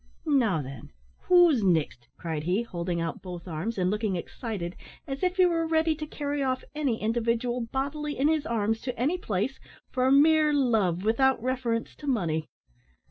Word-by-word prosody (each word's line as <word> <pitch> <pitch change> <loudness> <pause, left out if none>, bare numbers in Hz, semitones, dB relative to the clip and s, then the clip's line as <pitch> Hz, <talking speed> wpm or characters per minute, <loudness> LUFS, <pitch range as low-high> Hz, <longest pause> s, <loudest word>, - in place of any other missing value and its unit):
"Now, 230 - +2
thin, 135 +2 -9 0.4
who's 350 -8 +6
nixt?" 160 -9 +1
cried 160 -3 -3
he, 180 +8 0
holding 175 -5 -3
out 165 -1 -3
both 180 -1 -8
arms, 180 +8 -3
and 180 0 +1
looking 210 -2 -1
excited, 180 0 -5 0.3
as 275 -1 -5
if 360 0 +1
he 370 - +6
were 335 -2 +1
ready 320 0 +2
to 305 0 -6
carry 290 -1 -3
off 260 -1 -1
any 280 -7 -1
individual 235 +2 0
bodily 290 +2 -2
in 275 +3 +3
his 310 -1 +1
arms 225 -1 0
to 250 -3 -5
any 305 +9 +1
place, 220 - -2 0.3
for 255 0 +2
mere 305 +2 +5
love, 215 -10 +2
without 260 +5 +3
reference 245 -3 -1
to 295 - -9
money. 165 - 0
235 Hz, 170 wpm, -27 LUFS, 185-290 Hz, 0.4 s, who's